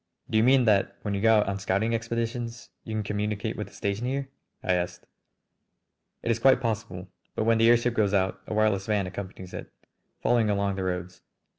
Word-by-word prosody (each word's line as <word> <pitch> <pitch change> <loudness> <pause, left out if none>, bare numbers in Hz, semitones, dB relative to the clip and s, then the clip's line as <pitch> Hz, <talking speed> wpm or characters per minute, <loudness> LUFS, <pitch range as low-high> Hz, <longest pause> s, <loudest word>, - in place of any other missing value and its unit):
"Do 110 - +3
you - - +4
mean 130 0 +5
that 100 -2 +3
when 105 - -2
you 100 - -1
go 110 0 +5
out - - -2
on 100 0 -2
scouting 100 +4 0
expeditions 115 +1 -3
you 110 - -5
can 110 - -1
communicate 105 0 -2
with - - -4
the - - -17
station 100 +4 -2
here?" 135 +1 -2 0.3
I 90 - +2
asked. 90 0 -2 1.2
"It 115 - +1
is 115 - 0
quite 135 +2 +5
possible. 110 -6 -3 0.3
But - - 0
when 115 0 +3
the 115 +1 +6
airship 120 0 +4
goes 105 -4 +2
out 95 -2 0
a - - -4
wireless 105 -2 +2
van 105 -3 +1
accompanies 95 -1 -7
it, - - -7 0.5
following 115 -3 +3
along 100 -1 +1
the 95 - -3
roads. 90 0 -4
105 Hz, 200 wpm, -27 LUFS, 100-115 Hz, 1.2 s, the